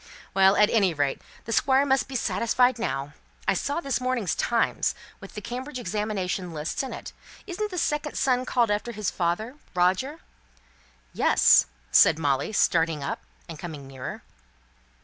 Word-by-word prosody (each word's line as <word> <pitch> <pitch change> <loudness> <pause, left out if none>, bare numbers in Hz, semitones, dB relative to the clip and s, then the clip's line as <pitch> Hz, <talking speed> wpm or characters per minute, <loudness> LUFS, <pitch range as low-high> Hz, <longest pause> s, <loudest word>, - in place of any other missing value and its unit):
"Well, 195 0 +5
at 210 +1 +4
any 195 -7 +3
rate, 145 -2 -1 0.2
the 230 - -5
Squire 270 +3 +3
must 265 -2 +2
be 265 - -8
satisfied 230 +3 +2
now. 140 -10 -3 0.3
I - - +4
saw 285 +3 -1
this 275 -6 -2
morning's 250 -7 0
Times, 235 -1 0 0.2
with - - -12
the 210 - -5
Cambridge 255 +4 -6
examination 195 -5 -3
lists 155 - -3
in 265 - -5
it. - - -8 0.3
Isn't 415 +3 -3
the 365 - -6
second 300 -2 -1
son 255 -2 +2
called 240 -3 +1
after 210 +3 -2
his 210 -3 -2
father, 205 +10 -2 0.2
Roger?" 190 - +1 0.9
"Yes," - - +5 0.2
said 145 - +6
Molly, 140 +1 0
starting 165 -7 +2
up, 140 - -4 0.3
and 165 -3 -9
coming 155 -5 -7
nearer. 135 -1 -7
215 Hz, 155 wpm, -26 LUFS, 170-255 Hz, 0.9 s, said